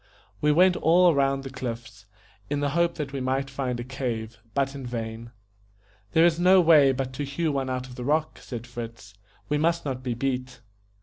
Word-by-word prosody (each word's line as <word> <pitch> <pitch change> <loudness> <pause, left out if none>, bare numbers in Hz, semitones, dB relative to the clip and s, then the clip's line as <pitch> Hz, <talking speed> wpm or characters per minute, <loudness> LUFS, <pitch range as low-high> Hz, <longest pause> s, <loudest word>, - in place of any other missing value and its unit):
We 150 - +4
went 180 +4 +5
all 175 +1 +5
round 135 -1 +1
the 135 - -7
cliffs, 115 -5 -7 0.4
in 145 0 -1
the 145 -1 0
hope 170 +2 +1
that 145 -4 -5
we 135 - -3
might 135 +1 -1
find 130 -2 -3
a - - -3
cave, 120 -3 -4 0.2
but 135 -1 +1
in 140 -1 -7
vain. 115 -1 -5 0.8
"There 165 +1 +6
is 170 -1 +2
no 185 +2 +6
way 155 -5 +6
but 130 0 -3
to 140 +3 -4
hew 150 +3 -1
one 135 -2 -2
out 130 0 -3
of 130 - -11
the 125 - -7
rock", 155 +4 0
said 120 -2 -7
Fritz, 115 -4 -8 0.3
"we 150 0 0
must 170 +1 +1
not 130 -2 -3
be 125 -2 -3
beat." 125 0 -3
135 Hz, 200 wpm, -26 LUFS, 125-150 Hz, 0.8 s, There